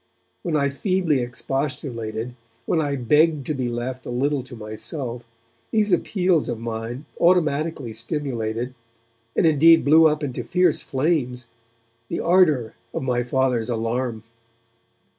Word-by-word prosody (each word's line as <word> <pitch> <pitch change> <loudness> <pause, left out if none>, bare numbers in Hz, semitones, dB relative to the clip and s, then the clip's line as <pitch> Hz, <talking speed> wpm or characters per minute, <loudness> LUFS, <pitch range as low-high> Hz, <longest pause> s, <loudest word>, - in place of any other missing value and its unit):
When 170 -5 -2
I 140 -2 +2
feebly 180 -2 +1
expostulated, 120 -2 -3 0.3
when 165 - +1
I 145 -2 -1
begged 150 +3 +3
to 155 - -1
be 130 -3 -2
left 125 +2 -4
a - - -5
little 135 +3 0
to 125 0 -11
myself, 115 +3 -6 0.5
these 210 -3 +2
appeals 180 -5 +1
of - - -2
mine 115 +4 -5
automatically 155 -7 +2
stimulated, 120 -1 -3 0.6
and - - +3
indeed 165 +1 +6
blew 160 +2 +7
up 150 0 0
into 125 -3 -3
fierce 175 +7 +2
flames, 130 -4 -1 0.6
the - - -3
ardour 155 -11 +3 0.2
of - - -2
my 125 -2 +1
Father's 125 -2 0
alarm. 115 0 -2
135 Hz, 130 wpm, -23 LUFS, 120-155 Hz, 0.6 s, blew